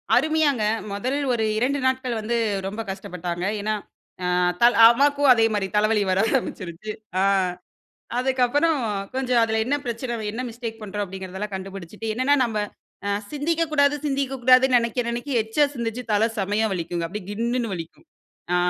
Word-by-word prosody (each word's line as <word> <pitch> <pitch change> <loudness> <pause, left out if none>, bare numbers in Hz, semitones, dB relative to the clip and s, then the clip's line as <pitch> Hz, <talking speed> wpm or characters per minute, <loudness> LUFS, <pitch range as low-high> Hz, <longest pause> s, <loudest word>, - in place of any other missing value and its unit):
அருமையாங்க, 310 -6 +2 0.3
முதல் 245 +8 -2 0.2
ஒரு 225 -2 0
2 265 +5 +1
நாட்கள் 260 -2 0
வந்து 230 +3 -1 0.3
ரொம்ப 210 +3 -4
கஷ்டப்பட்டாங்க. 180 -2 -5 0.2
ஏனா 215 +1 0 0.5
அ - - +1 0.2
அத்தாள் 235 +8 +4
அம்மாக்கும் 280 +4 +5
அதே 230 -2 +5
மாரி 205 -2 0
தலவலி 210 0 +3
வர 185 - +2
ஆரம்பிச்சுருச்சு. 210 -6 -3 0.3
ஆ - - +3 1.0
அதுக்கு 260 0 +1
அப்புறம் 290 +5 +2 0.4
கொஞ்சம் 255 -2 +2
அதுல 220 -1 +1
என்ன 275 +5 +1
பிரச்சனை 240 +1 -3
வ - - -5
என்ன 240 +3 -4
மிஸ்டேக் 230 -1 -7
பண்ணுறோம் 205 0 -3
அப்டிங்கிறதெல்லாம் 190 +2 -6
கண்டுபுடிச்சுட்டு 195 +2 -7
என்னென்னா 255 +5 +2
நம்ப 225 -3 -2 0.5
அ - - +1 0.2
சிந்திக்க 320 +3 0
கூடாது 285 -1 +4
சிந்திக்க 270 -1 -1
கூடாதுன்னு 255 +1 +6
நெனைக்க 235 +1 -1
நெனைக்க 240 +4 -4
எக்சா 220 +7 +2
சிந்திச்சு 235 -1 -3
தல 210 +1 +3
செமயா 205 +3 0
வலிக்குங்க, 170 -1 -3
அப்டியே 195 +1 -7
கின்னுனு 235 +3 -1
வலிக்கும். 165 -2 -9 0.5
ஆ. - - +4
230 Hz, 155 wpm, -24 LUFS, 205-260 Hz, 1.0 s, கூடாதுன்னு